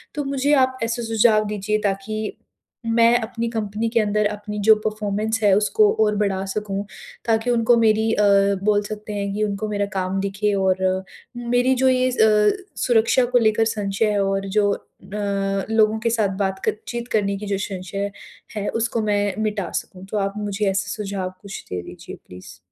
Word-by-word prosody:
तो 295 Hz, -, -1 dB
मुझे 275 Hz, +1 st, +1 dB
आप 260 Hz, 0 st, -9 dB
ऐसे 230 Hz, +1 st, -2 dB
सुझाव 220 Hz, -1 st, +3 dB
दीजिए, 210 Hz, 0 st, -1 dB
ताकि, 210 Hz, +2 st, -3 dB, 0.5 s
मैं 230 Hz, +1 st, +4 dB
अपनी 230 Hz, +1 st, -3 dB
कंपनी 220 Hz, 0 st, -2 dB
के 235 Hz, -, +2 dB
अंदर 210 Hz, 0 st, +1 dB
अपनी 210 Hz, 0 st, -6 dB
जो 220 Hz, -, +8 dB
परफ़ॉर्मेंस 215 Hz, +1 st, -1 dB
है, 205 Hz, -, +5 dB
उसको 420 Hz, -, +3 dB
और 210 Hz, -1 st, +1 dB
बढ़ा 195 Hz, -2 st, 0 dB
सकूँ, 200 Hz, 0 st, -3 dB, 0.4 s
ताकि 225 Hz, +1 st, +1 dB
उनको 235 Hz, 0 st, +3 dB
मेरी 220 Hz, -1 st, +3 dB
अ, -, -, +1 dB, 0.4 s
बोल 205 Hz, 0 st, +3 dB
सकते 210 Hz, 0 st, -7 dB
हैं 200 Hz, -1 st, -3 dB
कि 210 Hz, +1 st, -1 dB
उनको 210 Hz, +1 st, -2 dB
मेरा 205 Hz, -1 st, 0 dB
काम 190 Hz, 0 st, -1 dB
दिखे 200 Hz, +1 st, -1 dB
और 190 Hz, -1 st, +2 dB, 0.6 s
मेरी 245 Hz, +2 st, +2 dB
जो 265 Hz, -, +4 dB
ये 255 Hz, 0 st, +2 dB
अ, 215 Hz, -, +3 dB, 0.2 s
सुरक्षा 240 Hz, +1 st, +3 dB
को 245 Hz, 0 st, +2 dB
लेकर 225 Hz, 0 st, +3 dB
संशय 205 Hz, -1 st, -1 dB
है 205 Hz, -1 st, +1 dB
और 195 Hz, 0 st, -1 dB
जो 205 Hz, -1 st, +4 dB
अ, -, -, -3 dB, 0.9 s
लोगों 220 Hz, 0 st, +3 dB
के 230 Hz, +1 st, 0 dB
साथ 205 Hz, -4 st, 0 dB
बात 190 Hz, -1 st, -1 dB
क -, -, +2 dB
चीत 240 Hz, 0 st, -4 dB
करने 200 Hz, -1 st, +1 dB
की 210 Hz, -, -7 dB
जो 200 Hz, -1 st, 0 dB
संशय 195 Hz, +1 st, -4 dB, 0.4 s
है, 205 Hz, -1 st, -3 dB
उसको 230 Hz, 0 st, -1 dB
मैं 205 Hz, -2 st, 0 dB
मिटा 210 Hz, -3 st, -2 dB
सकूँ। 185 Hz, 0 st, -14 dB
तो 215 Hz, -, -1 dB
आप 195 Hz, -1 st, -1 dB
मुझे 205 Hz, 0 st, -1 dB
ऐसे 195 Hz, -, -2 dB
सुझाव 195 Hz, -3 st, -4 dB
कुछ 200 Hz, -1 st, -8 dB
दे 90 Hz, -1 st, -2 dB
दीजिए -, -, -10 dB
प्लीज़। 90 Hz, 0 st, -12 dB
210 Hz, 180 wpm, -22 LUFS, 200-225 Hz, 0.9 s, जो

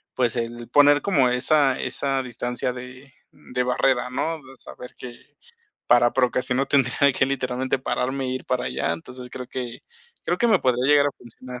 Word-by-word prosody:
pues 125 Hz, -2 st, 0 dB
el 120 Hz, 0 st, -4 dB
poner 145 Hz, +2 st, +5 dB
como 140 Hz, -11 st, +3 dB
esa 135 Hz, +2 st, +2 dB
esa 135 Hz, -1 st, -1 dB
distancia 125 Hz, 0 st, -3 dB
de 130 Hz, +2 st, -11 dB, 0.2 s
de 125 Hz, -3 st, -5 dB
barrera, 125 Hz, 0 st, +1 dB
¿no? 160 Hz, +6 st, -2 dB
De 135 Hz, -2 st, -15 dB
saber 125 Hz, -, -11 dB
que 120 Hz, -1 st, -9 dB, 0.7 s
para 120 Hz, 0 st, +4 dB
procrastinar 125 Hz, +1 st, +1 dB
tendría 140 Hz, +1 st, +3 dB
que 130 Hz, -, +3 dB
literalmente 130 Hz, -1 st, -2 dB
pararme 130 Hz, +1 st, -2 dB
e -, -, -3 dB
ir 130 Hz, 0 st, -4 dB
para 125 Hz, -1 st, -1 dB
allá. -, -, -1 dB
Entonces 125 Hz, -6 st, -8 dB
creo 125 Hz, 0 st, -8 dB
que 125 Hz, -2 st, -6 dB, 0.4 s
creo -, -, -1 dB
que 240 Hz, -, +3 dB
me 215 Hz, -5 st, +4 dB
podría 125 Hz, 0 st, +1 dB
llegar 145 Hz, -1 st, +5 dB
a -, -, -7 dB
funcionar. 125 Hz, +1 st, -11 dB
130 Hz, 175 wpm, -23 LUFS, 125-135 Hz, 0.7 s, poner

